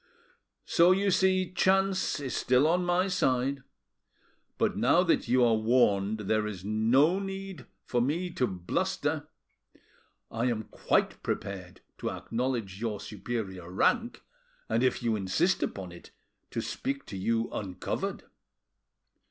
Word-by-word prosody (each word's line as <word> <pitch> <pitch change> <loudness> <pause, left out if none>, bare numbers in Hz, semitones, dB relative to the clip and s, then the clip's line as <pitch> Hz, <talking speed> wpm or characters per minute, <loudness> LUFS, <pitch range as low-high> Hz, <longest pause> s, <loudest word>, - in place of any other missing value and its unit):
So 170 +2 +5
you 195 +1 +1
see 185 -1 +2
chance 190 -2 +2
is 135 -3 -4
still 130 +3 +3
on 175 +3 +2
my 175 +2 +2
side. 135 -6 +1 1.0
But - - +1
now - - +4
that - - +1
you 125 +1 +4
are 115 - +4
warned 110 -2 +2
there 105 +1 0
is 95 -3 -7
no 125 - +3
need 195 -7 -6 0.2
for 120 - 0
me 170 +8 -1
to 125 - 0
bluster. 90 -2 -2 1.0
I 115 +2 -1
am 115 -3 0
quite - - 0
prepared 90 -2 -5 0.2
to - - -2
acknowledge 115 -5 -3
your 110 -3 -2
superior 100 -5 -5
rank, 235 - +1 0.4
and - - +1
if 130 -1 +1
you 115 -2 +1
insist 110 - +1
upon 95 -3 -4
it, 85 - -13 0.4
to - - -3
speak 140 +1 -4
to - - -8
you 115 +4 0
uncovered." 95 -3 -4
125 Hz, 135 wpm, -29 LUFS, 105-175 Hz, 1.0 s, So